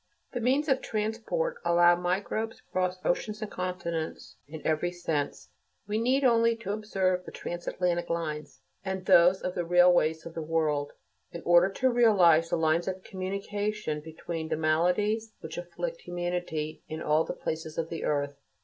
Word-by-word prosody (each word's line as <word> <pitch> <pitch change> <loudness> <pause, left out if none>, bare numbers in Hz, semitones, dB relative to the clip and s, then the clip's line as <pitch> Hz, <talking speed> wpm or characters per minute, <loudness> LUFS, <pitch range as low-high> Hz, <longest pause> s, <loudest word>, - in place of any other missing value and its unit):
The 245 - -3
means 270 +6 +2
of 265 -2 +2
transport 230 - -2
allow 175 0 +5
microbes 195 +5 -2
to - - -24
cross 185 -1 0
oceans 210 +4 0
and 215 - -6
continents 175 -3 -4
in 155 +1 -9
every 160 +3 +1
sense. 160 -5 -3 0.4
We 210 +2 -1
need 260 +4 +2
only 230 -2 +4
observe 195 -3 0
the - - -9
transatlantic 175 0 -2
lines, 155 -3 -4 0.2
and 190 -1 -4
those 180 +2 +6
of 180 - -2
the 175 - -1
railways 175 -2 +4
of 165 - -8
the 165 - -4
world, 155 -2 0 0.4
in 170 - -8
order 175 +2 +6
to 260 +4 +2
realize 180 -9 +5
the - - +1
lines 160 +1 +2
of 185 0 -3
communication 200 -2 -3
between 160 +1 -6
the 155 - 0
maladies 180 +8 +1
which 160 +1 -6
afflict - - -5
humanity 175 -3 -3
in 155 - -4
all 155 +2 +3
the - - -4
places 160 0 -5
of 165 0 -2
the 165 - -5
earth. 145 -1 -1
175 Hz, 160 wpm, -29 LUFS, 160-210 Hz, 0.4 s, those